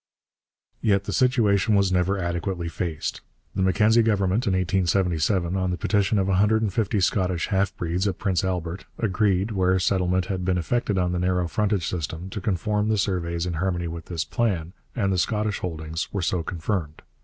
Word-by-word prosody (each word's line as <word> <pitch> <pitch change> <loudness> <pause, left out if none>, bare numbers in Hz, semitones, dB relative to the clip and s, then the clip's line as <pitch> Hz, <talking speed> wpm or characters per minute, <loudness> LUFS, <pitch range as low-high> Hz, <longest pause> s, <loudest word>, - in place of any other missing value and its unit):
Yet 100 -2 +2
the - - -4
situation 110 -5 +3
was 100 -2 +3
never 90 +2 +1
adequately 85 0 -2
faced. 85 -3 -3 0.3
The 95 - -1
Mackenzie 105 +5 +4
Government, 105 +1 +1
in 95 - +2
1877, 90 -1 +1
on 95 -1 0
the 90 - -2
petition 100 +1 +1
of 95 -1 +1
a 95 -1 +2
hundred 110 +3 +3
and 100 -4 -1
fifty 105 -1 0
Scottish 90 -2 0
half 100 0 0
breeds 90 +4 -1
at 95 - -2
Prince 95 -4 0
Albert, 90 -1 -3
agreed, 100 -1 +1
where 95 -2 +2
settlement 90 -1 +1
had 95 -1 -3
been 90 0 +1
effected 105 +3 0
on 90 -1 +1
the 90 - -1
narrow 90 -1 +1
frontage 100 -1 0
system, 85 +2 -4
to 105 - -5
conform 105 +2 0
the 110 - +2
surveys 85 -4 -1
in 90 - -2
harmony 85 +1 -1
with 85 0 -6
this 85 -3 -3
plan, 95 -8 -1 0.2
and 100 -6 +1
the 90 - +1
Scottish 105 +1 0
holdings 80 -2 -4
were 100 -3 -2
so 90 0 0
confirmed. 85 -2 -3
95 Hz, 185 wpm, -24 LUFS, 90-100 Hz, 0.3 s, Mackenzie